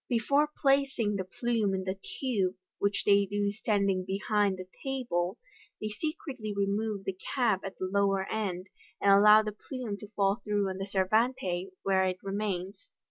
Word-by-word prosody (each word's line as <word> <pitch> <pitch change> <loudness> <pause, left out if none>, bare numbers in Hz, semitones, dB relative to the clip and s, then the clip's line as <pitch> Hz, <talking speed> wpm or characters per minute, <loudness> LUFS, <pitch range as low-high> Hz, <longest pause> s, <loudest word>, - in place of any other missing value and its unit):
Before 280 +5 +2
placing 270 -7 +2
the 190 - -2
plume 215 +1 0
in 190 - -2
the 190 0 -1 0.3
tube, 205 -9 0 0.2
which 200 0 +1
they 200 -1 +5
do 205 0 0
standing 200 -3 +1
behind 200 +1 0
the 185 - -7 0.2
table, 235 -8 -1 0.4
they 215 - -3
secretly 260 -2 -4
remove 200 +1 -1
the 195 - -2 0.2
cap 225 -8 +2
at 195 - -6
the 185 - -2
lower 195 0 +1
end, 190 -4 -2 0.3
and 200 - +4
allow 210 +2 +8
the 215 - -3
plume 220 0 -6
to 210 - -10
fall 200 0 +2
through 205 -1 0
on 190 - -4
the 195 - -3
servante, 190 -2 +1
where 190 -1 +3
it 185 -1 -1
remains. 195 - -3
200 Hz, 165 wpm, -30 LUFS, 195-220 Hz, 0.4 s, allow